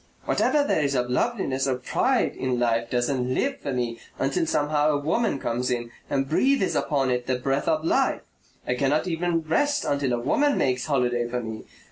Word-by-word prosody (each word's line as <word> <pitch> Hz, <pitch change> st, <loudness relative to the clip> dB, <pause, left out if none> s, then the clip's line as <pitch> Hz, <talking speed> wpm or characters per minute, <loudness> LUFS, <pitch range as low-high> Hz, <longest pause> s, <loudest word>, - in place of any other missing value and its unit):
Whatever 295 Hz, -1 st, +2 dB
there 285 Hz, -, +1 dB
is 140 Hz, -1 st, 0 dB
of 125 Hz, -1 st, 0 dB
loveliness 135 Hz, -, 0 dB
or 130 Hz, -, +1 dB
pride 125 Hz, -, 0 dB
in 130 Hz, -2 st, -1 dB
life 115 Hz, -1 st, +1 dB
doesn't 125 Hz, +1 st, 0 dB
LIVE 275 Hz, 0 st, -1 dB
for 140 Hz, -, -4 dB
me 120 Hz, -2 st, -2 dB, 0.2 s
until 135 Hz, +4 st, 0 dB
somehow 150 Hz, 0 st, +1 dB
a 150 Hz, -, +2 dB
woman 155 Hz, +6 st, 0 dB
comes 125 Hz, 0 st, -2 dB
in 120 Hz, -1 st, -2 dB, 0.2 s
and 135 Hz, -1 st, 0 dB
breathes 260 Hz, -, +2 dB
upon 135 Hz, -4 st, 0 dB
it 125 Hz, -1 st, -1 dB
the 130 Hz, -1 st, +1 dB
breath 135 Hz, +2 st, -1 dB
of 155 Hz, -1 st, +1 dB
life. -, -, +2 dB, 0.5 s
I -, -, +1 dB
cannot 140 Hz, +4 st, +1 dB
even 170 Hz, -1 st, 0 dB
rest 285 Hz, -, +1 dB
until 140 Hz, -3 st, 0 dB
a 120 Hz, -, 0 dB
woman 285 Hz, -, +2 dB
makes 130 Hz, +1 st, 0 dB
holiday 120 Hz, -4 st, +1 dB
for 125 Hz, +1 st, -3 dB
me. 110 Hz, -1 st, -7 dB
135 Hz, 190 wpm, -25 LUFS, 125-155 Hz, 0.5 s, Whatever